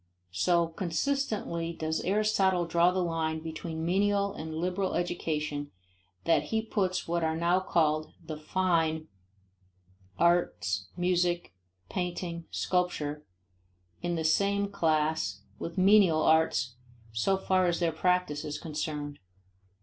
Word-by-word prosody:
So 170 - +2
consistently 170 -1 -2
does 160 -1 -2
Aristotle 195 -2 +2
draw 170 +1 +4
the 185 0 0
line 160 -2 -1
between 160 0 -5
menial 200 +2 +2
and 160 0 -6
liberal 180 +3 -1
education 150 -4 -2 0.5
that 165 - +3
he 220 0 -1
puts 195 -4 -1
what 170 0 0
are 160 0 +1
now 170 +2 +3
called 155 -4 +1
the 155 - -7
"fine" 160 -1 0 1.1
arts, 135 - +1
music, 175 -1 +1 0.3
painting, 175 - -3
sculpture, 150 -5 -1 0.8
in 175 0 -1
the 160 -1 -2
same 200 +5 +2
class 155 - 0 0.2
with 165 +1 -6
menial 185 -4 +5
arts 160 -5 +3 0.4
so 115 - +1
far 185 -1 +2
as 170 -1 +1
their 170 -2 +2
practice 180 -2 0
is 150 0 -4
concerned. 150 -2 -4
170 Hz, 120 wpm, -29 LUFS, 160-185 Hz, 1.1 s, menial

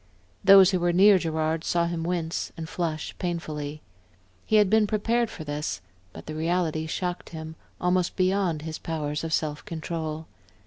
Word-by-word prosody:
Those 195 -1 +8
who 185 - +1
were 175 0 +2
near 195 +2 +6
Gerard 160 -1 -1
saw 170 -1 +1
him 170 -1 -3
wince 170 -1 -2
and 160 -1 -5
flush 160 -3 -3
painfully. 155 -4 -4 0.6
He - - +2
had 210 -2 +6
been 215 +1 +4
prepared 230 +3 +1
for 160 - -8
this, 145 -7 -3 0.3
but - - -11
the 155 - -6
reality 160 0 0
shocked 180 +2 -3
him, 160 -1 -7 0.2
almost 180 0 +1
beyond 185 -4 +1
his 160 -1 -5
powers 150 -2 -3
of 165 - -3
self 150 -2 -1
control. 160 -3 -4
165 Hz, 165 wpm, -26 LUFS, 155-185 Hz, 0.6 s, Those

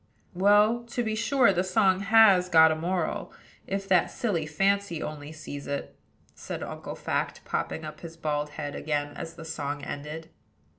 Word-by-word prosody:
"Well, 205 +5 +4
to 240 +1 -3
be 220 -1 -1
sure 230 0 +3
the 180 0 +1
song 185 0 +3
has 195 -3 +5
got 160 -2 +7
a - - +1
moral, 175 +3 -2 0.4
if 195 0 -3
that 180 -3 +4
silly 190 - -2
Fancy 195 +2 +1
only 150 -1 -6
sees 145 -3 -8
it," 140 - -4 0.4
said - - -6
Uncle - - -6
Fact, - - -3
popping - - -3
up - - -8
his 165 -1 -10
bald 150 -2 -2
head 145 -2 -4
again 145 -1 -2
as 165 +2 -7
the 165 - -10
song 145 -2 -4
ended. 155 +3 -6
170 Hz, 165 wpm, -27 LUFS, 150-200 Hz, 0.4 s, got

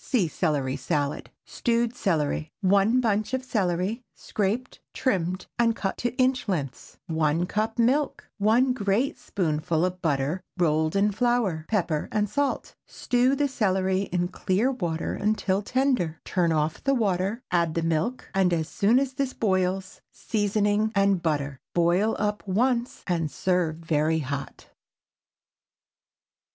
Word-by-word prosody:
(See 215 -10 +1
Celery 145 -5 -1
Salad.) 145 +2 -2 0.2
STEWED 235 0 0
CELERY. 155 -6 -1
✠ - - +4
1 200 +6 +4
bunch 215 +1 0
of 260 - -4
celery—scraped, 210 +3 -2 0.2
trimmed, 185 -6 -1
and 230 -1 +3
cut 195 0 -3
into 240 +1 -1
inch 255 -1 +2
lengths. 145 -8 -4
1 160 +1 +1
cup 215 +4 -2
milk. 270 +5 +1
1 235 +5 +3
great 215 +3 0
spoonful 160 -1 0
of 185 0 -4
butter, 145 +3 0 0.2
rolled 155 -1 +1
in 205 +1 +3
flour. 215 -7 0
Pepper 170 -8 0
and 210 -1 +1
salt. 280 +7 -1
Stew 250 +2 +1
the 290 +1 +1
celery 190 -6 0
in 175 0 0
clear 195 +7 0
water 170 -10 -2
until 205 -2 0
tender. 250 - 0
Turn 175 -3 +1
off 155 0 -1
the 275 0 +2
water, 200 0 0
add 170 -3 +1
the 165 - 0
milk, 165 +10 -1
and 190 -2 +3
as 160 -2 0
soon 210 +7 +2
as 265 0 0
this 275 -1 -2
boils, 190 -2 -1
seasoning 210 0 0
and 195 -2 +3
butter. 145 -4 -1 0.2
Boil 175 +6 +3
up 210 0 -1
once 240 +5 0
and 165 -4 0
serve 180 -2 0
very 160 -1 0
hot. 140 -2 -5
195 Hz, 140 wpm, -26 LUFS, 165-230 Hz, 0.2 s, ✠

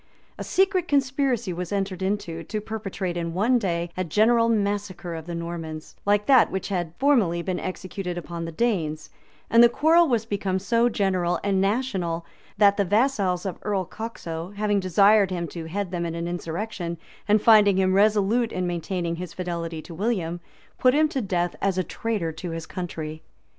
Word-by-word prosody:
A - - -3
secret 380 -2 +1
conspiracy 265 -7 +1
was 175 0 -5
entered 195 -2 -2
into, 190 -4 -2
to 215 - -3
perpetrate 205 -4 -4
in 170 -1 -3
one 235 +6 +3
day, 170 -4 -2
a 185 - -1
general 230 +7 +3
massacre 200 -4 -1
of 160 0 -7
the 170 - -4
Normans, 165 -2 -6
like 205 0 +3
that 265 -2 +6
which 190 - -4
had 175 -4 -2
formerly 215 -12 +2
been 185 -1 -2
executed 185 -1 -5
upon 170 -1 -5
the 165 - -5
Danes; 160 -7 -1 0.4
and 230 - +5
the 240 - +8
quarrel 325 +7 +4
was 235 -5 +1
become 200 -3 -1
so 230 +5 +2
general 185 -5 0
and 195 -1 +1
national, 195 -6 -1 0.3
that 200 -1 +5
the 200 - +3
vassals 200 -3 +1
of 190 - -4
Earl 195 -3 -1
Coxo, 180 -4 -6
having 205 0 +1
desired 200 +2 +4
him 175 -2 -3
to 165 -2 -7
head 185 +3 -3
them 170 -2 -2
in 165 - -4
an 170 0 -3
insurrection, 175 +1 -4 0.3
and 210 +1 +5
finding 210 -3 +6
him 185 -1 +2
resolute 215 +3 +3
in 185 - -2
maintaining 175 0 -2
his 180 -1 -6
fidelity 170 -3 -4
to 170 - -10
William, 175 -3 -1 0.4
put 255 +1 +4
him 310 +1 +4
to 270 - -2
death 175 -4 -1
as 195 -2 +1
a 185 - +2
traitor 205 -5 -2
to 160 +3 -7
his 165 -1 -5
country. 160 -3 -6
190 Hz, 180 wpm, -25 LUFS, 170-215 Hz, 0.4 s, the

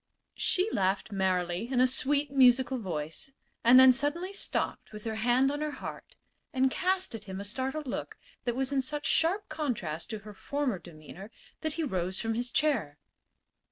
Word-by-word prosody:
She 370 +2 +2
laughed 195 +2 0
merrily 185 +1 0
in 255 - +2
a 255 - +6
sweet, 280 +2 +1
musical 260 -1 +4
voice, 165 - -4 0.3
and 245 +2 +8
then 260 0 +9
suddenly 295 +9 0
stopped 400 - -2
with 210 -1 -9
her 225 - -3
hand 245 +4 +3
on 290 +1 -3
her 305 - -1
heart - - -8 0.4
and 260 0 +2
cast 375 0 0
at 220 -2 -7
him 190 -1 -6
a - - -4
startled 265 +8 -3
look 255 - -5 0.3
that 240 -1 0
was 265 +1 -1
in 275 -1 +2
such 295 +2 -4
sharp 370 +6 +2
contrast 225 - -3
to 220 - -4
her 210 - -9
former 270 -1 -2
demeanor 170 +4 -11 0.3
that 315 -1 -2
he 330 - -2
rose 185 - -2
from 225 0 -1
his 240 +2 -2
chair. 230 - +1
250 Hz, 180 wpm, -30 LUFS, 200-290 Hz, 0.4 s, then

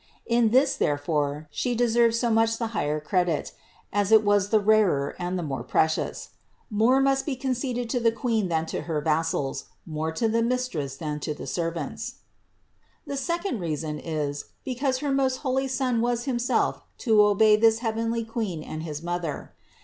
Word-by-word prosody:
In 235 -1 +3
this, 265 +4 +4
therefore, 145 0 -1
She 245 - -1
deserved 235 -1 +3
so 235 0 +1
much 225 0 +3
the 230 -1 -2
higher 150 -7 0
credit, 175 +1 0 0.4
as 205 0 +1
it 220 -1 +7
was 205 -1 +2
the 220 - +4
rarer 200 -9 +2
and 180 +1 -2
the 175 - -3
more 135 -5 -3
precious. 160 +6 0 0.4
More 225 +5 +4
must 270 0 +2
be 285 - -2
conceded 250 -2 -2
to 250 - +1
the 230 -1 +3
Queen 225 -4 0
than 160 -1 0
to - - -4
her 160 -3 -2
vassals, 155 -2 -1 0.2
more 160 0 -3
to 225 +8 0
the 230 +1 +1
Mistress 230 - -2
than 150 -2 -4
to 150 0 -3
the - - -8
servants. 175 +8 -3 0.9
20. - - -5
The 275 - -2
second 340 - -2
reason 155 -3 -3
is, 150 -3 -3 0.2
because 260 0 0
her 285 - +1
most 270 -1 +2
holy 265 +1 +1
Son 255 -3 0
was 240 0 0
Himself 245 -3 0 0.2
to 220 -4 +4
obey 210 +1 +5
this 220 +1 +4
heavenly 230 +1 -1
Queen 215 -8 -3
and 155 - -6
his 155 -1 -6
Mother. 175 -3 -4
220 Hz, 175 wpm, -26 LUFS, 160-245 Hz, 0.9 s, it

